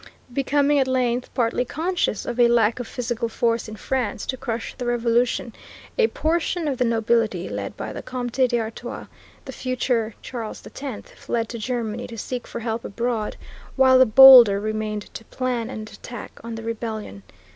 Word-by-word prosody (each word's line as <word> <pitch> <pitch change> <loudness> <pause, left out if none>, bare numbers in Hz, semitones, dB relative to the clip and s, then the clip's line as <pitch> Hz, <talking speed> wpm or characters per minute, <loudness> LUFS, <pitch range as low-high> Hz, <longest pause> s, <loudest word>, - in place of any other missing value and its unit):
Becoming 285 +2 +2
at 265 - +2
length 250 -1 0
partly 240 0 +1
conscious 325 - -1
of 240 0 -4
a 240 - +7
lack 235 -1 +3
of 245 - -5
physical 235 -1 -3
force 230 0 0
in 215 - -7
France 245 -2 -2
to 260 - -2
crush 230 -2 -4
the 245 - -5
revolution, 240 0 +1 0.4
a 465 -2 +4
portion 335 -1 -1
of 270 -4 -2
the 250 - +3
nobility, 225 -5 +1
led - - -5
by - - -5
the - - -6
Comte 250 0 -1
d'Artois, 235 0 -4 0.4
the - - -6
future 245 -3 -1
Charles 230 -4 -6
X, 265 -6 -7
fled 230 -1 -3
to 235 - -6
Germany 235 0 -3
to 230 - -9
seek 245 +3 -5
for - - -6
help 230 0 -3
abroad, 230 0 -2 0.4
while 260 -1 +6
the 260 - +7
bolder 240 -4 +9
remained 215 0 -3
to - - -8
plan 245 -2 -2
an 220 - -6
attack 225 +2 -10
on 230 0 -6
the 225 - -7
rebellion. 220 - -5
235 Hz, 170 wpm, -23 LUFS, 225-255 Hz, 0.4 s, bolder